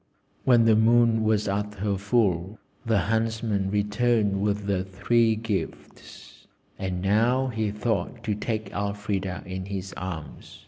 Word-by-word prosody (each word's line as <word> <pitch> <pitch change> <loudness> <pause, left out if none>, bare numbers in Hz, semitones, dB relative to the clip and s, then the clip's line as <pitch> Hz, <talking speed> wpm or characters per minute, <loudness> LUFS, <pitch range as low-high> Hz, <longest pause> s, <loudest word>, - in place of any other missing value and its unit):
When 120 -3 +5
the 110 -1 +5
moon 115 0 +4
was 110 -1 +1
at 105 +1 -2
her 100 0 -1
full 100 -2 0 0.3
the 110 -4 +2
Huntsman 110 -2 0
returned 105 0 +1
with 105 0 0
the 95 -2 0
three 110 +4 +2
gifts, 110 -2 -6 0.3
and 95 -2 -3
now 120 +6 +2
he 110 -3 -1
thought 105 +1 -2
to 105 - -1
take 110 +1 -3
Elfrida 100 -2 -3
in 95 0 -5
his 95 -1 -5
arms. 80 -7 -7
105 Hz, 135 wpm, -26 LUFS, 95-115 Hz, 0.3 s, When